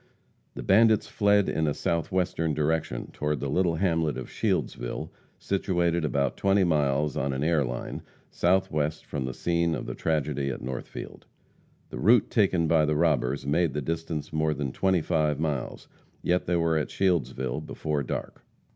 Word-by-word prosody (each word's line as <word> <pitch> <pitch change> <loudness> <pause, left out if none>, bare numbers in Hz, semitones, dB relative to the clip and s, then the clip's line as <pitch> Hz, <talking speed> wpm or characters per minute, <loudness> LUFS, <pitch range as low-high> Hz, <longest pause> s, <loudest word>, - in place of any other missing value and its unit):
The - - -6
bandits 110 +1 +4
fled 100 -1 +3
in 80 -1 0
a 75 - 0
southwestern 85 -2 -1
direction, 75 -3 -1
toward 75 -1 -1
the 70 0 -3
little 90 0 +2
hamlet 80 -4 +1
of 65 - -7
Shieldsville, - - -2 0.3
situated 85 -3 0
about 70 -3 0
20 100 0 +3
miles 75 -3 +1
on 70 - -1
an 65 +2 -2
air 80 -2 +2
line, - - -5 0.3
southwest 80 -4 0
from 70 -3 -3
the 65 - -4
scene 85 -1 +1
of - - -5
the - - -4
tragedy 75 -3 -1
at 65 - -5
Northfield. 65 0 -7 0.6
The - - -6
route 115 +1 +4
taken 95 -7 +2
by 80 -1 +4
the 75 0 0
robbers 70 -5 +1
made 80 +1 +1
the - - 0
distance 80 0 -4
more 80 0 +1
than 70 -2 -3
twenty 95 +3 +1
five 75 -3 0
miles; 75 -5 -3 0.4
yet 90 +1 +1
they 90 - +1
were 80 -2 +2
at 75 - -3
Shieldsville 65 -9 0
before 75 -2 -2
dark. 65 - -5
80 Hz, 165 wpm, -27 LUFS, 70-85 Hz, 0.6 s, bandits